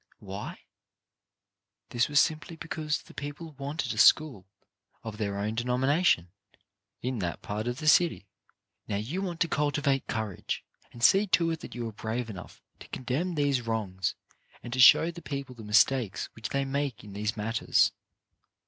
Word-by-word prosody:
Why? 100 0 -7 1.4
Simply 155 +6 +2
because 155 -2 -3
the - - -16
people 145 +3 -7
wanted 145 +2 -3
a - - -4
school 130 -12 +5 0.6
of 110 -1 -7
their 100 -2 -2
own 105 +2 -1
denomination 125 - +2 0.7
in 125 -1 -2
that 85 -3 -3
part 105 +3 -3
of 120 0 -2
the 155 +1 -4
city. 165 - +4 0.6
Now 105 - -2
you 125 - -3
want 175 -4 -4
to 170 - +4
cultivate 145 -2 0
courage, 110 -4 -3 0.3
and 120 - -10
see 200 +8 +6
to 170 -3 +3
it 165 - -3
that - - -9
you 120 -1 -3
are - - -5
brave 115 +2 -3
enough 95 -3 -11 0.2
to - - -12
condemn 150 +8 -2
these 140 -4 +1
wrongs 100 -5 -2 0.5
and 120 - -6
to 130 - -2
show 160 +6 +8
the 170 0 -10
people 140 -4 -5
the 120 - -12
mistakes 110 +1 +2
which 115 - -6
they 140 0 0
make 140 -4 -2
in 105 -2 -11
these 105 +2 -2
matters. 110 +2 +2
130 Hz, 160 wpm, -29 LUFS, 110-150 Hz, 1.4 s, show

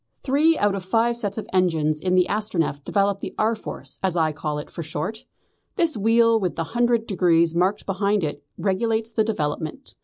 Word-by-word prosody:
"Three 300 +4 +3
out 205 -1 +2
of 195 - -3
the 180 - -15
five 235 +2 +2
sets 205 -3 -3
of 220 - -4
engines 160 -5 +2
in 185 +2 0
the 180 -1 +5
Astronef 180 -9 -1
develop 200 +2 +1
the - - -7
R. 225 +2 +2
Force, 220 - -7
as 185 -2 0
I 160 -1 +2
call 150 0 -4
it 150 - -7
for - - -6
short. 160 +8 -5 0.5
This 335 -6 +2
wheel 230 +2 +4
with 185 -4 -2
the 165 - -1
hundred 240 -1 +2
degrees 170 -4 +2
marked 185 +4 +1
behind 200 0 0
it 145 -1 -4
regulates 220 +3 0
the 220 -1 +2
development. 155 -7 -3
200 Hz, 195 wpm, -23 LUFS, 165-225 Hz, 0.5 s, the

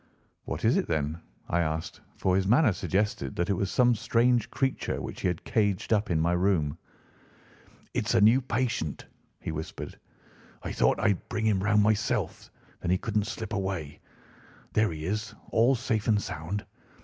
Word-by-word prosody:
"What - - -3
is - - +4
it, - - 0
then?" 80 0 -1 0.3
I 85 - +1
asked, 80 -1 -2 0.2
for 95 -1 +2
his 95 0 +1
manner 120 +2 +5
suggested 95 -9 -1
that 85 +3 0
it - - +4
was 95 +1 -1
some 120 +2 +4
strange 120 +1 +2
creature 135 -1 -1
which - - -6
he - - +1
had 90 -2 -2
caged 105 0 +1
up 105 -1 +1
in 80 -3 +2
my 85 +2 +2
room. 90 -5 +1 1.2
"It's - - 0
a - - +6
new 115 +6 +6
patient," 120 - -2 0.3
he - - -4
whispered. 80 0 -6 0.6
"I - - -4
thought - - +2
I'd 105 -4 0
bring 110 -1 -1
him 105 -4 +2
round 105 0 +4
myself; 105 0 0 0.3
then 85 - -3
he 90 - +4
couldn't 105 +1 -1
slip 115 -1 -5
away. 95 -7 -3 0.7
There 110 -2 +3
he 80 -1 -5
is, 105 +3 -3 0.2
all 120 +4 +4
safe 115 -3 -1
and 105 -2 +4
sound. 95 +3 -4
100 Hz, 175 wpm, -28 LUFS, 85-110 Hz, 1.2 s, a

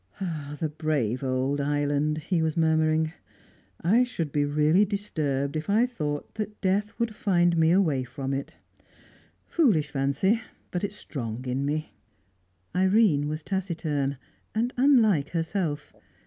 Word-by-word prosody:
"The 155 -2 -2
brave 140 -6 -1
old 130 +2 0
island!" 145 +1 0
he 165 +2 -1
was 160 0 -1
murmuring. 160 0 +2 0.7
"I 220 +9 +5
should 170 - -3
be 145 0 +1
really 150 +6 +3
disturbed 155 -9 -2
if 155 +4 -3
I 220 +4 +4
thought 150 -7 -4 0.2
death 205 +3 0
would 235 -2 -1
find 175 -5 +2
me 160 -1 +4
away 165 -8 +3
from 135 +1 -4
it. 135 +1 -4 0.9
Foolish 185 - +2
fancy, 140 - +1 0.3
but 180 - -2
it's 205 0 -3
strong 125 - -6
in 130 +2 -1
me." 155 +1 -2 0.8
Irene 190 -6 +3
was 155 +1 -4
taciturn, 160 -8 -2 0.4
and 235 +3 0
unlike 230 - +4
herself. 165 -3 -2
155 Hz, 130 wpm, -27 LUFS, 145-195 Hz, 0.9 s, I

